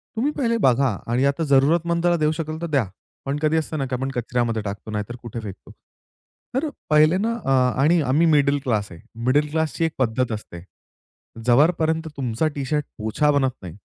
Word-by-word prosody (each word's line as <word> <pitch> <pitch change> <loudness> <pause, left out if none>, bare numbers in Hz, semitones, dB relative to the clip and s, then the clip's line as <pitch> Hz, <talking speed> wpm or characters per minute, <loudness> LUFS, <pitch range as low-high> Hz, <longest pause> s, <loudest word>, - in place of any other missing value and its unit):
तुम्ही 255 +7 0
पहिले 235 -4 +1
बघा 135 +1 +4 0.2
आणि 125 +3 +2
आता 140 +3 +1
जरूरतमंदला 170 +5 +3
देऊ 155 -1 +2
शकाल 155 0 -4
तर 170 - -2
द्या. 140 -8 +1 0.4
पण 140 +1 -1
कधी 155 +1 +2
असतं 155 0 -2
ना 135 - -1
की 130 - -3
आपण 135 +2 -3
कचऱ्यामध्ये 120 -2 -1
टाकतो, 105 +1 -6
नाहीतर 105 +2 -4
कुठे 120 -1 -6
फेकतो. 100 -4 -9 0.8
तर 295 +4 0 0.2
पहिले 155 +3 +5
ना 225 +4 0
अ, 135 - +1 0.3
आणि 165 +4 +4
आम्ही 145 +4 +2
मिडल 145 -2 +3
क्लास 105 -5 0
आहे, 85 - -11 0.3
मिडल 145 +4 +3
क्लासची 160 +1 0
एक 160 - -1
पद्धत 125 -1 0
असते. 95 -5 -7 0.8
जोपर्यंत 160 +5 +3
तुमचा 130 +3 -1
टी 140 -2 -3
शर्ट 150 +2 -1
पोछा 110 +7 +1
बनत 140 -2 +2
नाही 85 -3 -9
140 Hz, 180 wpm, -22 LUFS, 120-160 Hz, 0.8 s, पहिले